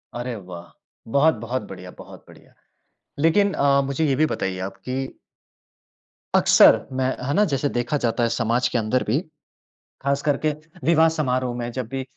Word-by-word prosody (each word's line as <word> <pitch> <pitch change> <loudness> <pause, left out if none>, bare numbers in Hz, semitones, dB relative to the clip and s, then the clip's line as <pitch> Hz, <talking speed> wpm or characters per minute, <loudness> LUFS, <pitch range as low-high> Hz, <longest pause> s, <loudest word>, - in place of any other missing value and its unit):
अरे 120 0 -4
वाह! 90 -4 -10 0.4
बहुत 150 +5 +4
बहुत 120 +3 -4
बढ़िया, 90 -1 -10
बहुत - - -13
बढ़िया। - - -18 0.7
लेकिन 195 +6 +3
अ, 140 0 +3
मुझे 140 +4 -1
ये 140 -3 +2
भी 155 +4 +3
बताइए 95 -10 -3
आप 95 - -21
कि 130 +1 -4 1.2
अक्सर, - - +6
मैं 130 0 0 0.2
है 140 - 0
ना? 205 - +4
जैसे 145 -4 -1
देखा 120 +4 -1
जाता 120 -2 0
है 115 - +2
समाज 120 +2 +1
के - - -1
अंदर 115 +3 0
भी 120 +7 +2 0.8
ख़ास 140 +1 0
करके 150 +1 +1 0.3
विवाह-समारोह 155 -6 +2
में 120 0 -4
जब 130 -1 -4
भी 135 +2 -4
130 Hz, 165 wpm, -23 LUFS, 120-145 Hz, 1.2 s, अक्सर